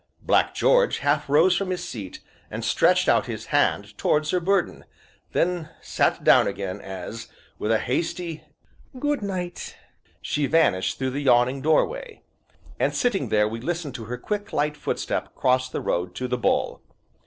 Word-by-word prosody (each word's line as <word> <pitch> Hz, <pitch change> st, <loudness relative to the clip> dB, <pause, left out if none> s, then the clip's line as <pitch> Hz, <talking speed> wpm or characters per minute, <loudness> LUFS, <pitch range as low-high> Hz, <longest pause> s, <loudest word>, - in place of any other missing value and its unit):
Black -, -, +2 dB
George -, -, +3 dB
half 145 Hz, +1 st, 0 dB
rose 165 Hz, +6 st, +5 dB
from 195 Hz, +1 st, -1 dB
his 180 Hz, -1 st, -3 dB
seat, 100 Hz, -, -7 dB, 0.3 s
and -, -, -5 dB
stretched -, -, +3 dB
out -, -, +3 dB
his -, -, -5 dB
hand 100 Hz, +1 st, +1 dB
towards 150 Hz, 0 st, +1 dB
her 180 Hz, -, +2 dB
burden, 190 Hz, +1 st, 0 dB, 0.5 s
then 175 Hz, -2 st, 0 dB
sat -, -, 0 dB
down -, -, +6 dB
again 100 Hz, 0 st, -4 dB
as, 95 Hz, +4 st, -7 dB, 0.3 s
with 105 Hz, -, -1 dB
a 110 Hz, -, +4 dB
hasty 165 Hz, +6 st, -3 dB, 0.5 s
"Good 290 Hz, 0 st, -1 dB
night," 185 Hz, -3 st, -5 dB, 0.4 s
she 145 Hz, -1 st, -1 dB
vanished 135 Hz, -, +2 dB
through 130 Hz, -1 st, -1 dB
the 140 Hz, +3 st, -3 dB
yawning 130 Hz, 0 st, +3 dB
doorway. 455 Hz, -, 0 dB, 0.6 s
And, -, -, +1 dB
sitting 195 Hz, -, 0 dB
there, 105 Hz, 0 st, +3 dB
we 115 Hz, +1 st, -5 dB
listened 165 Hz, -1 st, -3 dB
to 115 Hz, -3 st, -7 dB
her 125 Hz, +3 st, -5 dB
quick, 205 Hz, -, -4 dB
light 150 Hz, +1 st, 0 dB
footstep 145 Hz, -, -3 dB
cross 130 Hz, 0 st, +2 dB
the -, -, -4 dB
road 90 Hz, +1 st, -2 dB
to 125 Hz, -, -3 dB
"The 125 Hz, 0 st, -2 dB
Bull." -, -, 0 dB
145 Hz, 165 wpm, -24 LUFS, 115-180 Hz, 0.6 s, down